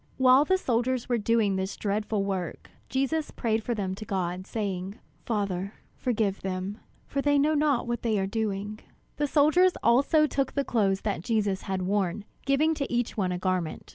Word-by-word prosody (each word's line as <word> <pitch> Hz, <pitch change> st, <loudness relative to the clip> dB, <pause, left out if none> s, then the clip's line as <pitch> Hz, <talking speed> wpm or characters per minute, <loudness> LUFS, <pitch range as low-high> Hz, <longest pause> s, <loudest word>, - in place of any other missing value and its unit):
While 260 Hz, +2 st, +6 dB
the 375 Hz, +4 st, +3 dB
soldiers 250 Hz, -4 st, 0 dB
were 240 Hz, -2 st, +1 dB
doing 215 Hz, -2 st, +2 dB
this 190 Hz, +1 st, -3 dB
dreadful 210 Hz, 0 st, -1 dB
work, 190 Hz, -4 st, -4 dB, 0.2 s
Jesus 275 Hz, +4 st, 0 dB
prayed 225 Hz, -2 st, -1 dB
for 240 Hz, -, -1 dB
them 195 Hz, -3 st, -2 dB
to 200 Hz, -, -7 dB
God, 185 Hz, -2 st, -3 dB
saying: 195 Hz, -3 st, -3 dB, 0.3 s
"Father, 200 Hz, -3 st, -2 dB, 0.2 s
forgive 215 Hz, -5 st, -1 dB
them; 190 Hz, +2 st, -4 dB, 0.3 s
for 280 Hz, -, -2 dB
they 290 Hz, 0 st, +3 dB
know 295 Hz, +2 st, +3 dB
not 290 Hz, -4 st, +2 dB
what 240 Hz, 0 st, -2 dB
they 225 Hz, -3 st, +1 dB
are 190 Hz, -, +1 dB
doing." 210 Hz, 0 st, -3 dB, 0.4 s
The 295 Hz, -, +1 dB
soldiers 315 Hz, +6 st, +4 dB
also 280 Hz, +6 st, +4 dB
took 275 Hz, -2 st, -1 dB
the 280 Hz, -1 st, 0 dB
clothes 195 Hz, -4 st, +1 dB
that 205 Hz, -6 st, -2 dB
Jesus 205 Hz, -2 st, 0 dB
had 190 Hz, -1 st, -3 dB
worn, 200 Hz, +1 st, -1 dB, 0.2 s
giving 300 Hz, +4 st, +3 dB
to 285 Hz, -3 st, -3 dB
each 240 Hz, -1 st, 0 dB
one 190 Hz, -5 st, 0 dB
a 180 Hz, -, -1 dB
garment. 185 Hz, -3 st, -2 dB
215 Hz, 180 wpm, -27 LUFS, 195-265 Hz, 0.4 s, While